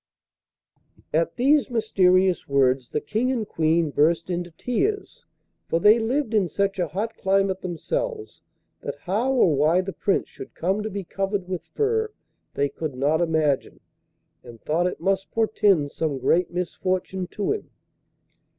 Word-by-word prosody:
At 165 Hz, +2 st, +1 dB
these 275 Hz, +4 st, +3 dB
mysterious 190 Hz, -6 st, +2 dB
words 130 Hz, -2 st, +2 dB
the 150 Hz, -, -2 dB
King 240 Hz, +4 st, -1 dB
and 230 Hz, -5 st, -2 dB
Queen 160 Hz, -2 st, +1 dB
burst 165 Hz, +5 st, +2 dB
into 175 Hz, 0 st, -3 dB
tears, 385 Hz, -, -2 dB, 0.4 s
for 165 Hz, -, +1 dB
they 210 Hz, +6 st, +6 dB
lived 235 Hz, +2 st, -1 dB
in 205 Hz, -4 st, +3 dB
such 195 Hz, +4 st, -1 dB
a 175 Hz, -, +1 dB
hot 205 Hz, +9 st, -3 dB
climate 195 Hz, 0 st, +1 dB
themselves 450 Hz, -, -4 dB, 0.4 s
that -, -, -5 dB
how 215 Hz, +8 st, 0 dB
or 240 Hz, -, +4 dB
why 155 Hz, +5 st, +3 dB
the 190 Hz, 0 st, -6 dB
Prince 195 Hz, +5 st, 0 dB
should -, -, -11 dB
come 190 Hz, +5 st, 0 dB
to 215 Hz, -, -3 dB
be 200 Hz, -1 st, -5 dB
covered 195 Hz, +1 st, -3 dB
with 185 Hz, -2 st, -4 dB
fur 445 Hz, 0 st, 0 dB, 0.4 s
they 140 Hz, -, +1 dB
could 140 Hz, 0 st, -5 dB
not 145 Hz, +5 st, +1 dB
imagine, 155 Hz, -5 st, 0 dB, 0.6 s
and 120 Hz, -2 st, -12 dB
thought 165 Hz, +7 st, 0 dB
it 180 Hz, -, -4 dB
must 195 Hz, 0 st, 0 dB
portend 205 Hz, -9 st, +2 dB
some 155 Hz, -4 st, -2 dB
great 165 Hz, +7 st, +2 dB
misfortune 185 Hz, +1 st, -2 dB
to 205 Hz, +3 st, -2 dB
him. 425 Hz, -, -4 dB
185 Hz, 150 wpm, -24 LUFS, 160-220 Hz, 0.6 s, they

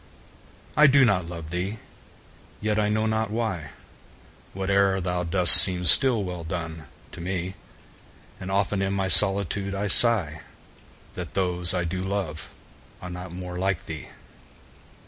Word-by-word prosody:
I 150 Hz, +2 st, +4 dB
do 135 Hz, -1 st, +2 dB
not 90 Hz, -6 st, -2 dB
love 85 Hz, -2 st, -11 dB
thee!—yet, 105 Hz, +2 st, -9 dB
I 105 Hz, 0 st, -2 dB
know 110 Hz, +1 st, -3 dB
not 110 Hz, -1 st, -3 dB
why, 105 Hz, -, -6 dB, 0.7 s
5 -, -, -26 dB
Whate'er 95 Hz, 0 st, -1 dB
thou 90 Hz, -1 st, -5 dB
dost 90 Hz, 0 st, +7 dB
seems 90 Hz, -2 st, +7 dB
still 125 Hz, -6 st, +4 dB
well 90 Hz, -2 st, -9 dB
done, 80 Hz, -1 st, -9 dB, 0.2 s
to -, -, -12 dB
me: 90 Hz, +1 st, -6 dB, 0.9 s
And 95 Hz, -, -10 dB
often 100 Hz, 0 st, -3 dB
in 95 Hz, 0 st, -4 dB
my 95 Hz, -1 st, -4 dB
solitude 100 Hz, +1 st, +3 dB
I 100 Hz, +1 st, -5 dB
sigh 95 Hz, -7 st, +4 dB, 0.7 s
That 90 Hz, -3 st, -10 dB
those 90 Hz, -1 st, -1 dB
I 90 Hz, -, -3 dB
do 90 Hz, +2 st, -6 dB
love 95 Hz, -5 st, -7 dB, 0.5 s
are 90 Hz, -, -11 dB
not 90 Hz, 0 st, -11 dB
more 90 Hz, 0 st, -9 dB
like 95 Hz, -2 st, -4 dB
thee! 80 Hz, -1 st, -9 dB
95 Hz, 145 wpm, -22 LUFS, 90-100 Hz, 0.9 s, dost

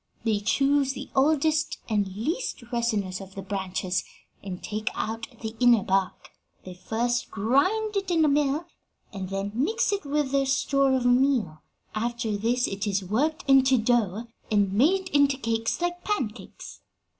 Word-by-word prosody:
They 220 Hz, -3 st, +1 dB
choose 275 Hz, +5 st, +2 dB
the -, -, -8 dB
oldest 305 Hz, +2 st, +2 dB
and 210 Hz, -3 st, +1 dB
least 315 Hz, -, -3 dB
resinous 215 Hz, -6 st, -1 dB
of 190 Hz, 0 st, -12 dB
the 195 Hz, -, -6 dB
branches 190 Hz, -2 st, -2 dB, 0.4 s
and 185 Hz, -2 st, -7 dB
take 215 Hz, 0 st, -2 dB
out 225 Hz, +1 st, -3 dB
the 220 Hz, 0 st, -5 dB
inner 240 Hz, -4 st, +5 dB
bark. 190 Hz, -1 st, -1 dB, 0.3 s
They 185 Hz, -, -7 dB
first 235 Hz, +6 st, -2 dB
grind 370 Hz, -, +1 dB
it 390 Hz, -2 st, -1 dB
in 330 Hz, -3 st, +3 dB
a -, -, +4 dB
mill, 290 Hz, +2 st, +1 dB, 0.5 s
and 190 Hz, -2 st, -5 dB
then 195 Hz, +1 st, -3 dB
mix 380 Hz, -, +1 dB
it 400 Hz, -, -2 dB
with 290 Hz, -1 st, -1 dB
their 275 Hz, -1 st, +2 dB
store 275 Hz, 0 st, +2 dB
of 255 Hz, -1 st, -1 dB
meal; 245 Hz, -, +2 dB, 0.3 s
after 235 Hz, 0 st, -2 dB
this 235 Hz, +4 st, +1 dB
it 195 Hz, +2 st, -3 dB
is 200 Hz, -1 st, 0 dB
worked 290 Hz, -, -1 dB
into 265 Hz, -1 st, +5 dB
dough 225 Hz, -2 st, +1 dB, 0.2 s
and 205 Hz, -3 st, +2 dB
made 365 Hz, -, +2 dB
into 285 Hz, -4 st, +3 dB
cakes 225 Hz, -2 st, -1 dB
like 350 Hz, 0 st, -2 dB
pancakes. 260 Hz, -, -4 dB
240 Hz, 155 wpm, -26 LUFS, 205-280 Hz, 0.5 s, inner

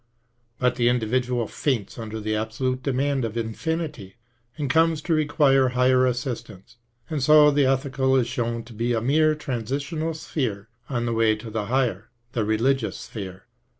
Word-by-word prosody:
But 125 Hz, 0 st, +1 dB
the 120 Hz, -1 st, +3 dB
individual 120 Hz, 0 st, 0 dB
faints 120 Hz, -6 st, -2 dB
under 110 Hz, -1 st, -5 dB
the 110 Hz, 0 st, -2 dB
absolute 125 Hz, +4 st, -2 dB
demand 135 Hz, 0 st, 0 dB
of 115 Hz, 0 st, -3 dB
infinity, 130 Hz, -, -3 dB, 0.4 s
and 150 Hz, -2 st, -2 dB
comes 160 Hz, +3 st, +3 dB
to 170 Hz, -, 0 dB
require 145 Hz, -3 st, +3 dB
higher 130 Hz, 0 st, +4 dB
assistance; 120 Hz, -3 st, -5 dB, 0.3 s
and 155 Hz, -3 st, -3 dB
so 150 Hz, +2 st, +7 dB
the 140 Hz, -2 st, +3 dB
ethical 130 Hz, 0 st, +1 dB
is 130 Hz, -3 st, +3 dB
shown 120 Hz, -2 st, -2 dB
to 115 Hz, -, -13 dB
be 115 Hz, +2 st, -1 dB
a 115 Hz, -, +1 dB
mere 155 Hz, +5 st, +3 dB
transitional 145 Hz, +5 st, -3 dB
sphere 115 Hz, -10 st, -3 dB, 0.2 s
on 120 Hz, -3 st, -1 dB
the 115 Hz, -, -1 dB
way 115 Hz, -1 st, +3 dB
to 110 Hz, +1 st, -9 dB
the 110 Hz, -1 st, -2 dB
higher, 120 Hz, -5 st, 0 dB, 0.2 s
the 115 Hz, -, -1 dB
religions 115 Hz, +3 st, +1 dB
existence. 95 Hz, -3 st, -8 dB
125 Hz, 160 wpm, -24 LUFS, 115-140 Hz, 0.4 s, so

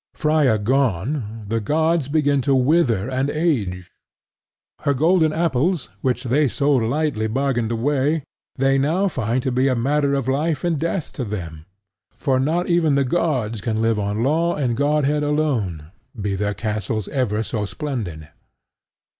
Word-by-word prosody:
Freia 150 Hz, -7 st, +2 dB
gone, 115 Hz, -, -1 dB
the 115 Hz, +2 st, 0 dB
gods 160 Hz, +5 st, +1 dB
begin 145 Hz, -2 st, +2 dB
to 135 Hz, +2 st, +2 dB
wither 130 Hz, -, +2 dB
and 130 Hz, +2 st, -1 dB
age: 115 Hz, -, -1 dB, 0.9 s
her 140 Hz, -, 0 dB
golden 160 Hz, +2 st, +3 dB
apples, 165 Hz, 0 st, 0 dB
which 125 Hz, -1 st, 0 dB
they 140 Hz, +4 st, +2 dB
so 140 Hz, +4 st, 0 dB
lightly 130 Hz, -2 st, +1 dB
bargained 120 Hz, -1 st, 0 dB
away, 140 Hz, +5 st, 0 dB, 0.3 s
they 135 Hz, +1 st, +2 dB
now 165 Hz, +8 st, +1 dB
find 125 Hz, -, -1 dB
to 130 Hz, -, 0 dB
be 130 Hz, +2 st, +2 dB
a 130 Hz, -, +2 dB
matter 140 Hz, +3 st, +1 dB
of 135 Hz, -3 st, -2 dB
life 145 Hz, +2 st, 0 dB
and 170 Hz, -4 st, 0 dB
death 170 Hz, +1 st, -2 dB
to 130 Hz, -, -4 dB
them; 85 Hz, -8 st, -6 dB, 0.5 s
for 130 Hz, -3 st, 0 dB
not 160 Hz, +6 st, +1 dB
even 170 Hz, -4 st, +2 dB
the 140 Hz, -1 st, +2 dB
gods 125 Hz, -8 st, -1 dB
can 110 Hz, 0 st, -1 dB
live 115 Hz, -1 st, +1 dB
on 105 Hz, +2 st, -1 dB
Law 165 Hz, +5 st, +1 dB
and 125 Hz, -5 st, 0 dB
Godhead 150 Hz, +1 st, +1 dB
alone, 120 Hz, -, -1 dB, 0.3 s
be 100 Hz, -1 st, -1 dB
their 105 Hz, +1 st, -1 dB
castles 110 Hz, -1 st, -3 dB
ever 115 Hz, -6 st, 0 dB
so 105 Hz, -2 st, -3 dB
splendid. 100 Hz, -, -5 dB
135 Hz, 155 wpm, -21 LUFS, 110-150 Hz, 0.9 s, golden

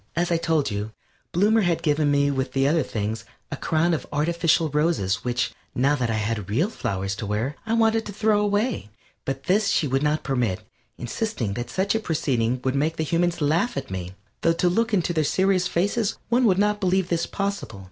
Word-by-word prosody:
As 175 Hz, +1 st, 0 dB
I 170 Hz, -, +3 dB
told 160 Hz, -6 st, 0 dB
you, 105 Hz, +2 st, -4 dB, 0.4 s
Bloomer 210 Hz, +5 st, +3 dB
had 175 Hz, -4 st, 0 dB
given 150 Hz, -1 st, +2 dB
me 140 Hz, 0 st, +3 dB
with 135 Hz, -1 st, -2 dB
the 135 Hz, 0 st, +2 dB
other 160 Hz, +2 st, +3 dB
things, 110 Hz, -3 st, -3 dB, 0.3 s
a -, -, -2 dB
crown 165 Hz, +2 st, +1 dB
of 160 Hz, -, -3 dB
artificial 165 Hz, +2 st, +2 dB
roses 150 Hz, -, +1 dB
which, 125 Hz, 0 st, -1 dB, 0.2 s
now 135 Hz, +4 st, +3 dB
that 125 Hz, -4 st, -1 dB
I 110 Hz, -, 0 dB
had 105 Hz, -2 st, -2 dB
real 150 Hz, -, +1 dB
flowers 95 Hz, -, -3 dB
to 110 Hz, -, -4 dB
wear, 110 Hz, +8 st, -1 dB
I 225 Hz, -, 0 dB
wanted 225 Hz, 0 st, +2 dB
to -, -, -5 dB
throw 210 Hz, +1 st, +2 dB
away, 205 Hz, -, 0 dB, 0.4 s
but 135 Hz, 0 st, -3 dB
this 195 Hz, +6 st, +2 dB
she 165 Hz, -6 st, +2 dB
would 135 Hz, +1 st, 0 dB
not 150 Hz, +1 st, +1 dB
permit, 120 Hz, -9 st, -1 dB, 0.4 s
insisting 125 Hz, -, -3 dB
that 120 Hz, +2 st, -5 dB
such 190 Hz, +7 st, 0 dB
a 225 Hz, -, +1 dB
proceeding 130 Hz, -, 0 dB
would 130 Hz, -, 0 dB
make 150 Hz, +4 st, 0 dB
the 160 Hz, -, 0 dB
humans 170 Hz, +2 st, 0 dB
laugh 160 Hz, -, +1 dB
at 135 Hz, -5 st, -5 dB
me 90 Hz, -1 st, -5 dB, 0.3 s
though 165 Hz, -, +3 dB
to 175 Hz, +2 st, +2 dB
look 225 Hz, +5 st, +1 dB
into 180 Hz, -4 st, +1 dB
their 155 Hz, -2 st, +1 dB
serious 185 Hz, +3 st, +2 dB
faces 200 Hz, +5 st, 0 dB
one 245 Hz, +1 st, +3 dB
would 190 Hz, -4 st, +4 dB
not 210 Hz, +1 st, +2 dB
believe 185 Hz, -1 st, +1 dB
this 170 Hz, -1 st, 0 dB
possible. 200 Hz, -, -3 dB
155 Hz, 210 wpm, -24 LUFS, 125-190 Hz, 0.4 s, would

